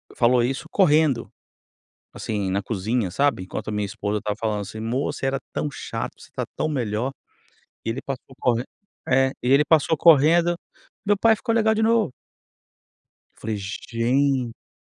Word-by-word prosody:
falou 120 0 +4
isso 130 +3 -2
correndo, 155 - +3 0.8
assim, 100 -3 -3
na 100 +2 0
cozinha, 110 0 -1
sabe, 140 -3 +1
enquanto 95 - -6
a - - -3
minha 105 0 -1
esposa 100 +1 -3
estava 105 0 -3
falando 105 -2 -1
assim: 105 +2 -7
"Mô, 120 +6 -1
você 140 - -5
era 135 0 0
tão 150 - -1
chato, - - -5
você - - -14
tá - - -2
tão 155 - -1
melhor", 120 -3 -1 0.7
e - - -1
ele 115 +4 -3
passou 135 0 -6
corren 120 -1 +1 0.5
é, 135 0 +4 0.2
e 125 - 0
ele 140 +2 +6
passou 160 0 +3
correndo, 170 +2 +5 0.5
"meu 205 0 +3
pai 225 +2 +5
ficou 230 +1 -2
legal 220 -1 +3
de 220 - 0
novo". 225 - +2 1.2
Eu - - -23
falei: 110 -1 -2
"Gente". 115 - -1
125 Hz, 165 wpm, -23 LUFS, 110-150 Hz, 1.2 s, ele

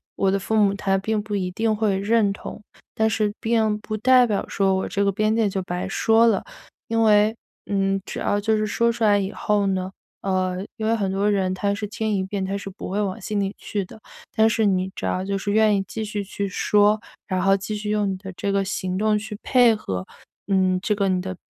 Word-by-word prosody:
我 195 - +1
的 195 - +2
父 220 +3 -2
母 205 -2 +4
他 195 -1 0
并 215 +2 -1
不 210 -1 -4
一 185 -2 -1
定 220 +3 0
会 210 -3 +1
认 205 0 +2
同， 200 - -9 0.3
但 220 0 +2
是 210 0 0
并 220 -2 +1
不 215 +1 -5
代 255 +2 +5
表 210 -3 -1
说 195 -1 +1
我 190 - -1
这 200 +2 0
个 200 - +2
边 215 +3 +1
界 220 -3 +2
就 190 0 -2
白 180 +1 -4
说 225 +3 +4
了。 210 -4 +2 0.5
因 225 0 +1
为， 215 +1 +4 0.3
嗯， 195 -1 0
只 - - -6
要 205 - 0
就 220 +1 +1
是 215 0 0
说 235 +2 +2
出 230 0 -3
来 205 -2 +5
以 195 +1 -2
后 210 -2 0
呢 185 -1 -1 0.3
呃， 185 -1 0 0.2
因 220 - -3
为 225 - +3
很 200 -3 -1
多 200 +2 +1
人 190 -2 +1
他 200 +2 0
是 210 0 -4
听 220 0 -2
一 190 - 0
遍 190 0 -3
他 195 +1 -2
是 200 - -7
不 190 - -8
会 205 - 0
往 195 -2 -2
心 210 -1 -2
里 195 0 -2
去 200 -3 -3
的， 220 - -14 0.3
但 220 0 +5
是 220 0 +1
你 190 -1 +1
只 - - -5
要 185 - -1
就 195 0 -1
是 205 +1 -4
愿 215 0 +4
意 195 - 0
继 220 - -4
续 210 -1 -3
去 200 +1 -4
说， 210 +2 +3 0.3
然 185 -1 -1
后 195 +1 +4
继 200 +2 -5
续 210 0 -4
用 210 -2 +1
你 190 - -4
的 190 0 -9
这 200 - -2
个 195 0 +1
行 185 -1 -3
动 215 0 +2
去 215 -1 -7
配 245 -3 +5
合， 95 - -4 0.4
嗯， 185 -2 +2
这 210 - 0
个 200 -1 +1
你 185 -1 +1
的 185 0 -5
205 Hz, 260 characters per minute, -23 LUFS, 195-215 Hz, 0.5 s, 代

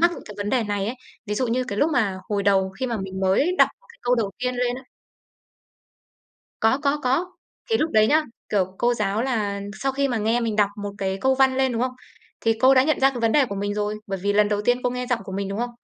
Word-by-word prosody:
mắc 345 +1 +5
những - - -9
cái 210 - -10
vấn 205 0 -3
đề 255 -2 +2
này 205 -1 -2
ấy. 230 - -3 0.3
Ví 210 - -2
dụ 255 +4 0
như 250 +2 0
cái 200 - -5
lúc 300 +6 +3
mà 205 -8 +1
hồi 205 -1 0
đầu 195 -1 +2
khi 260 - 0
mà 235 -2 -2
mình 190 0 -6
mới 195 - +2
đọc - - +7
một - - -27
cái - - -22
câu 245 +1 +2
đầu 220 -4 -1
tiên 250 +1 -1
lên 245 0 0
á 265 - -9 1.8
Có, 225 +4 +3
có, 285 0 +1
có. 270 +9 +1 0.4
Thì 450 - +4
lúc 315 -4 0
đấy 215 0 +5
nhá, 310 +6 +4 0.3
kiểu, 195 -3 +1
cô 240 0 +2
giáo 210 0 -1
là 210 -6 -1 0.2
sau 270 0 +1
khi 275 +1 0
mà 240 -3 -1
nghe 225 +3 +1
mình 225 -3 -1
đọc 205 -1 +3
một 205 - -3
cái 190 0 -2
câu 265 0 +3
văn 265 0 +3
lên, 265 -1 +2
đúng 230 0 -1
không? 255 0 -1 0.5
Thì 225 - +2
cô 260 +2 +6
đã 260 - +6
nhận 310 +1 +1
ra 270 0 +5
cái 250 -3 -6
vấn 230 -1 +2
đề 295 -2 +5
của 200 - -5
mình 205 +1 -2
rồi, 210 0 -1
bởi 195 -1 -3
vì 205 +1 +1
lần 210 0 +3
đầu 205 -1 0
tiên 245 +3 +2
cô 250 - +1
nghe 250 0 -4
giọng 245 -2 0
của 190 - -8
mình, 195 0 -3
đúng 200 +1 -4
không? 240 +1 -2
230 Hz, 280 wpm, -23 LUFS, 205-260 Hz, 1.8 s, đọc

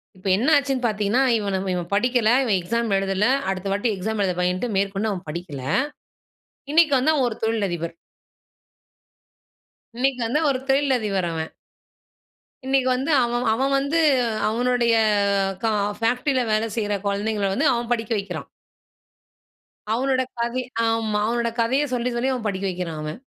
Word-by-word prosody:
இப்ப 185 +1 -8
என்ன 250 +8 +1
ஆச்சுனு 275 -2 -1
பார்த்தீங்கனா 215 +3 +1 0.2
இவன 200 -2 -1
இவன் 175 -1 -3
படிக்கல, 240 +1 +2
இவன் 215 -7 +2
எக்ஸாம் 230 +4 -1
எழுதல, 195 +2 +1 0.2
அடுத்த 190 0 -3
வாட்டி 205 +4 0
எக்ஸாம் 210 +2 -2
எழுத 185 -2 0
பயன்டு, 180 +6 0
மேற்கொண்டு 200 +2 0
அவன் 185 -2 -5
படிக்கல. 150 -4 -6 1.1
இன்னைக்கு 315 -2 +5
வந்து 290 +5 +3
அவன் 270 -4 +2
ஒரு 220 - -6
தொழில் 220 -2 +1
அதிபர். 170 -1 -4 2.0
இன்னைக்கு 260 +1 0
வந்து 245 +7 +1
ஒரு 265 -2 0
தொழில் 270 0 +3
அதிபர் 195 -5 -1
அவன். 160 -1 -4 1.1
இன்னைக்கு 265 -1 +2
வந்து 265 +5 -1
அவன், 240 +1 -1
அவன் 270 +4 0
வந்து 280 +4 0 0.5
அவனுடைய, 240 0 +1 1.1
ஃபேக்டரில 250 +2 +1
வேலை 215 +1 +1
செய்ற 210 -2 0
குழந்தைகள 200 0 -1
வந்து 280 +9 +2
அவன் 235 0 -3
படிக்க 230 -1 -1
வைக்கிறான். 200 0 -5 1.5
அவனுடைய 260 +1 0
கதை 235 +2 -1 0.3
ஆமா, 225 -2 0
அவனுடைய 235 0 -1
கதையை 260 +6 +1
சொல்லி 245 0 0
சொல்லி 255 +3 0
அவன் 245 -4 -4
படிக்க 195 -1 -3
வைக்கிறான் 175 -4 -4
அவன். 155 +8 -5
225 Hz, 140 wpm, -23 LUFS, 195-250 Hz, 2.0 s, இன்னைக்கு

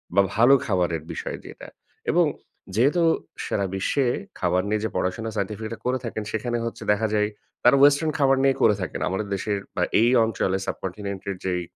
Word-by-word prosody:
বা 100 - +7
ভালো 120 +6 +6
খাবারের 90 -5 0
বিষয় - - -5
যেটা। - - -10 0.4
এবং - - +4 0.5
যেহেতু 145 +10 +3 0.4
সারা 100 - -1
বিশ্বে 130 +8 +1 0.3
খাবার 90 0 +2
নিয়ে 105 0 0
যে - - -1
পড়াশোনা 110 +5 -1
সাইন্টিফিকরা 110 +3 -3
করে 130 +1 +1
থাকেন 110 -2 -4
সেখানে 120 +2 -1
হচ্ছে 115 - -5
দেখা 105 +2 +1
যায় 105 -1 +2 0.3
তারা 125 +3 +6
ওয়েস্টার্ন 145 +2 +5
খাবার 135 -1 +4
নিয়ে 135 -1 +4
করে 105 -2 +5
থাকেন। 90 - -4
আমাদের 100 +3 -2
দেশের 100 +1 -2 0.2
বা - - +1 0.2
এই 120 - +5
অঞ্চলে 95 -4 0
সাবকন্টিনেন্ট 100 +1 -5
এর 100 - -2
যেই 90 -1 0
110 Hz, 175 wpm, -24 LUFS, 95-120 Hz, 0.5 s, বা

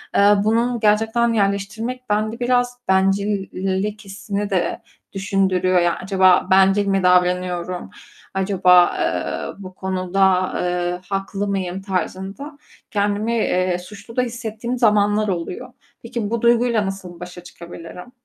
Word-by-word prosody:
eee, 205 +1 +6
bunun 230 +2 +1
gerçekten 225 +2 +2
yerleştirmek 215 +5 -2
bende 215 +3 -1
biraz 245 0 0
bencillik 195 +1 0
hissini 200 +1 -4
de 185 -3 -1 0.3
düşündürüyor, 190 -2 +1
yani, 175 -1 +2
acaba 185 -1 +4
bencil 195 +1 +4
mi 195 -1 +1
davranıyorum, 180 0 +1 0.4
acaba, 185 -2 +4
eee, - - -2
bu 185 0 -9
konuda, 185 0 +1
eee, 180 0 -2
haklı 195 +1 -2
mıyım 190 -1 -3
tarzında 195 - -4 0.3
kendimi, 205 +1 0
eee, 185 -5 +1
suçlu 205 +5 -12
da 250 - +3
hissettiğim 235 0 -4
zamanlar 210 -2 +3
oluyor. 185 +7 -4 0.3
Peki, 230 -3 -4
bu 235 -1 -2
duyguyla 235 -2 +3
nasıl 185 -3 -7
başa 180 0 -9
çıkabilirim? 175 +5 -11
195 Hz, 120 wpm, -21 LUFS, 185-220 Hz, 0.4 s, eee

